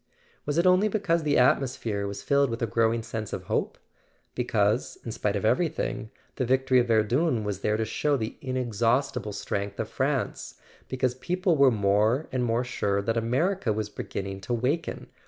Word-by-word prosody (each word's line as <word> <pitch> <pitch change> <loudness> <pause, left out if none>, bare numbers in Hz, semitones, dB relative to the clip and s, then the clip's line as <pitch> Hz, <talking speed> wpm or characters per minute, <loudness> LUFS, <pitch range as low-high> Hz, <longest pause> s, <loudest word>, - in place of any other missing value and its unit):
Was 145 +1 0
it 170 - +3
only 185 +3 +5
be¬ 210 0 -2
cause 170 -3 +2
the 150 -2 +1
atmosphere 120 -5 +1
was 100 0 -6
filled 140 +3 +3
with 115 0 -3
a - - +4
growing 115 +1 +1
sense 110 -2 -5
of - - -4
hope? - - -2 0.6
Because, 110 -2 0
in 115 - -4
spite 105 -1 -1
of 100 - -1
everything, 125 -3 0 0.3
the - - 0
victory 130 +1 +3
of 120 - +1
Verdun 115 +4 +2
was 100 -2 -3
there 105 +1 0
to 110 - 0
show 140 +6 0
the 110 -2 -4
inexhaustible 125 -2 0
strength 100 0 -4
of 110 - -1
France, 135 +2 -2 0.3
because 130 -1 0
people 180 +6 0
were 140 -2 +6
more 110 +5 +2
and 130 -1 0
more 120 +1 +1
sure 100 -5 -1
that 115 +3 0
America 130 - 0
was 105 0 -2
beginning 95 -1 -5
to 120 +5 -2
waken 140 +8 -2
120 Hz, 180 wpm, -27 LUFS, 110-140 Hz, 0.6 s, were